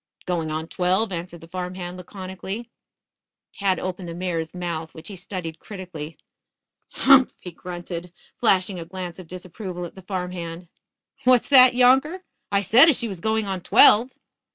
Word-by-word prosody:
"Going 170 -3 -2
on 155 +1 -4
twelve," 185 +5 0
answered 170 -1 -6
the 165 - -12
farm 180 +1 -5
hand 180 -1 -6
laconically. 190 +4 -7 0.8
Tad 195 -2 0
opened 185 -1 -5
the 165 - -6
mare's 170 -3 -3
mouth, 170 -3 -5
which 160 +3 -10
he 200 - -8
studied 175 -3 -7
critically. 180 -6 -8 0.8
"Humph!" 270 -1 +5
he 180 - -8
grunted, 175 0 -7 0.2
flashing 190 -4 +1
a 165 - -7
glance 180 0 -7
of 180 - -11
disapproval 180 0 -7
at 170 - -10
the 190 - -12
farm 180 -1 -4
hand. 170 -1 -7 0.5
"What's 250 -2 +4
that, 255 -3 +7
younker? 265 +9 +3 0.3
I 200 -1 +2
said 245 - +7
as 290 - +3
she 235 - -1
was 195 -5 -7
going 220 +3 0
on 190 -2 -3
twelve." 220 +6 +6
185 Hz, 165 wpm, -23 LUFS, 175-205 Hz, 0.8 s, that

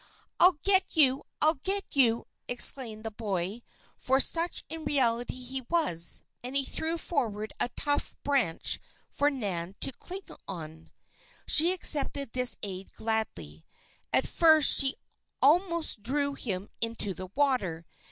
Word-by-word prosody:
"I'll 360 -2 +5
get 380 -2 +3
you! 270 -3 +4 0.2
I'll 310 +1 +5
get 390 -2 -2
you!" 235 -4 +2 0.2
exclaimed 240 -3 +3
the 225 - -5
boy, 205 0 -5 0.3
for 265 +1 0
such 335 +5 +2
in 320 0 -8
reality 245 -5 -1
he 260 +1 -5
was, 295 - +3 0.2
and 255 +2 -7
he 275 -1 +3
threw 320 +5 -3
forward 220 -10 -4
a - - 0
tough 290 0 -2
branch 260 -13 0 0.3
for 290 +1 0
Nan 195 -9 -5
to - - +3
cling 370 +9 -7
to. 160 - -10 0.5
She 330 +3 +6
accepted 285 -7 +3
this 250 -1 +2
aid 190 -1 -6
gladly. 220 - -4 0.5
At - - +1
first 315 -3 +6
she 270 -1 +2 0.4
almost 335 - +1
drew 280 +5 -1
him 200 -7 -5
into 230 -3 -2
the 185 0 -9
water. 245 - -1
255 Hz, 135 wpm, -27 LUFS, 205-295 Hz, 0.5 s, She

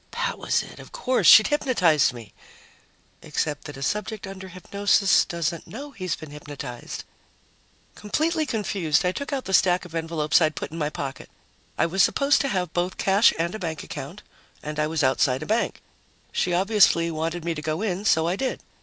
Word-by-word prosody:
That - - -2
was - - 0
it, - - -12
of - - -12
course! 260 - +1
She'd 215 - +9
hypnotized 200 - +3
me.... 115 -4 -12 0.9
Except 150 -2 -3
that 145 - -8
a 135 - -6
subject 210 - -3
under 190 -1 -8
hypnosis 195 +2 +2
doesn't 170 -1 -3
know 285 +6 -8
he's 185 -8 -3
been 155 -2 -11
hypnotized. 145 -4 -7 0.9
Completely 310 +9 -1
confused, 195 - 0
I 180 - +2
took 280 +10 -5
out 270 -2 -2
the 190 - -4
stack 180 -1 +3
of 175 - -12
envelopes 160 -1 +1
I'd 155 -1 +2
put - - -5
in 165 - -6
my 150 -1 0
pocket. 140 -3 -6 0.5
I - - +3
was 185 +3 +1
supposed 280 +1 +3
to 275 - 0
have 180 -8 -2
both 180 +1 -1
cash 200 +3 +4
and 170 +2 -1
a 215 - -5
bank 160 -4 -4
account, - - -8 0.4
and 150 0 -5
I 150 - +2
was 160 -1 -1
outside 130 +1 +2
a - - -6
bank. 225 +5 -1 0.5
She 180 - 0
obviously 180 -3 +3
wanted 165 +1 -3
me 170 - 0
to 150 - -6
go 155 +6 -2
in, 195 -2 -2
so 165 -6 +3
I 175 - 0
did. 260 +5 -2
175 Hz, 190 wpm, -24 LUFS, 155-210 Hz, 0.9 s, She'd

